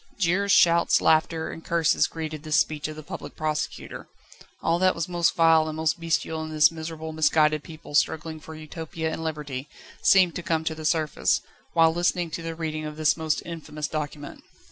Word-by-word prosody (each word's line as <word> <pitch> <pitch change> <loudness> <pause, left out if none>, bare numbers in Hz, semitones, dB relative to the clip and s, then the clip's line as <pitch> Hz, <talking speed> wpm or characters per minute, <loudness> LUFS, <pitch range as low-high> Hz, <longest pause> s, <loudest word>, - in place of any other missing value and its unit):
Jeers, 195 +2 +1
shouts, 170 -2 +5
laughter, 160 0 +2
and 165 - -9
curses 165 -2 +2
greeted 155 -2 -6
this 155 0 +2
speech 155 -3 -1
of 155 - -7
the 155 - -9
Public - - -8
Prosecutor. 155 -1 -4 0.6
All 165 +1 +2
that 185 0 +3
was 165 +1 -2
most 175 -1 +1
vile 165 -1 +5
and 155 - -5
most 160 +1 0
bestial 160 -1 -1
in 155 - -6
this 155 0 +4
miserable, 160 0 -6
misguided 155 -1 +3
people 160 -3 -11
struggling 160 +1 0
for 160 +1 -10
Utopia 160 +1 -5
and 160 - -5
Liberty, 150 -3 -5 0.3
seemed 185 -3 +5
to - - -4
come 160 -1 -1
to 160 - -1
the 155 0 -8
surface, 155 -1 +1 0.3
whilst 165 -1 +5
listening 175 -1 0
to 165 - -4
the 165 0 -5
reading 155 -1 -4
of 150 0 -6
this 155 -1 +3
most 160 -2 -1
infamous 155 -3 -5
document. 150 -1 -5
160 Hz, 190 wpm, -25 LUFS, 155-165 Hz, 0.6 s, shouts